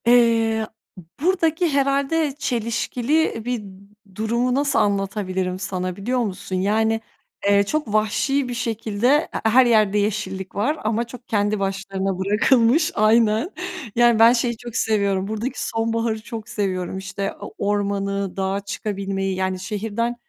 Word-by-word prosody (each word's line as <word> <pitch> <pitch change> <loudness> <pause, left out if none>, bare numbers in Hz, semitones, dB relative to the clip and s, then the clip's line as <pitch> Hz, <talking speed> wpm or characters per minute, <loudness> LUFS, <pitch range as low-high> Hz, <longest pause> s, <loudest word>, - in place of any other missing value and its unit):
Eee, 230 -2 +4 0.3
b - - -9 0.2
buradaki 340 -1 +2
herhâlde 280 +1 +1
çelişkili 235 +2 0
bir 245 -3 -2 0.5
durumu 235 +4 0
nasıl 280 +1 +2
anlatabilirim 195 -3 -1
sana 185 -1 -3
biliyor 245 +7 -1
musun? 195 -4 -3
Yani, 220 +4 +1 0.5
eee, 200 0 +5
çok 245 0 -2
vahşi 250 +6 +1
bir - - -3
şekilde 225 -1 -1
e 295 +4 +2
he 220 - +1
her 255 +3 +6
yerde 215 -4 +3
yeşillik 200 -2 -2
var 265 +10 0
ama 220 +2 0
çok 245 0 -12
kendi 205 -1 +1
başlarına 195 -1 -2
bırakılmış. 230 - +3
Aynen. 220 - +3 0.5
Yani, 240 -1 +4
ben 230 +1 +8
şeyi 235 -1 0
çok 240 0 -9
seviyorum, 200 -4 +1
buradaki 220 +5 -3
sonbaharı 225 0 -1
çok 220 -1 -8
seviyorum. 190 -3 -2
İşte 195 +1 -4
o - - -8
ormanı, 200 -1 -1
dağa 195 +1 0
çıkabilmeyi, 195 -1 -3
yani, 185 0 -1
şehirden 220 +4 -2
220 Hz, 135 wpm, -22 LUFS, 200-240 Hz, 0.5 s, ben